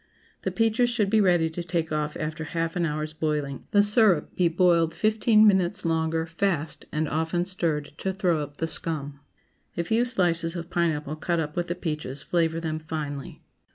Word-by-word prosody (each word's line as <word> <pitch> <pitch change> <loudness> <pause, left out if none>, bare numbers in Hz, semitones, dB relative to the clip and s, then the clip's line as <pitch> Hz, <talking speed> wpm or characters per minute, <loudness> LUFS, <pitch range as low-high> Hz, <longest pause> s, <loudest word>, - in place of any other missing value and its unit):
The - - -1
peaches 225 +2 +2
should 215 -5 0
be 220 -1 +4
ready 175 -4 +3
to 175 - -4
take 165 -1 -2
off 150 0 -2
after 160 +1 -4
half 165 +1 -2
an 175 -1 +1
hour's 155 0 -3
boiling; 150 -3 -3
the 205 0 +5
syrup 205 -6 +4
be 180 - +3
boiled 170 -1 +3
fifteen 215 0 +4
minutes 190 -2 +3
longer, 160 0 0
fast, 165 -2 -2
and 155 +1 -1
often 160 +4 -1
stirred, 160 -6 -2
to 190 - -1
throw 180 -4 +1
up 145 0 -6
the 165 - -1
scum. 145 -4 -3 0.6
A 170 - +1
few 225 +7 +1
slices 175 -7 0
of 170 0 -6
pineapple 155 -3 -1
cut 170 +1 -1
up 150 -2 -3
with 175 0 -1
the 175 - -2
peaches 150 -5 -4
flavor 165 -1 0
them 160 -1 -3
finely. 150 -3 -6
165 Hz, 185 wpm, -26 LUFS, 155-180 Hz, 0.6 s, the